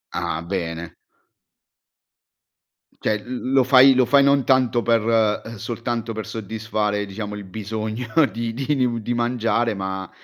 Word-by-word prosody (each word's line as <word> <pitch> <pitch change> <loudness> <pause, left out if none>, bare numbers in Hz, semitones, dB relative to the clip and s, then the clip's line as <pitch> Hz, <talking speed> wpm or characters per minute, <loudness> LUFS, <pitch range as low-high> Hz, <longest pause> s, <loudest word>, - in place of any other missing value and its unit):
Ah, 85 -2 -2
bene. 85 -2 -4 2.1
Cioè, 105 -1 -1
l 125 +1 -5
lo 135 -1 +5
fai 130 +1 +7
lo 130 -1 +3
fai 140 +1 +5
non 140 -1 +3
tanto 125 -3 +2
per 115 -1 +2 0.4
ehm, 115 +1 -8
soltanto 115 +1 -4
per 110 0 -5
soddisfare, 105 -1 -2
diciamo, 105 +1 -6
il 105 - -7
bisogno 110 +4 -5 0.2
di 115 0 -4
di 140 +4 -1
mu 115 -1 -2
di 120 +3 -3
mangiare, 120 -1 0
ma, 95 -1 -5
115 Hz, 140 wpm, -22 LUFS, 105-120 Hz, 2.1 s, fai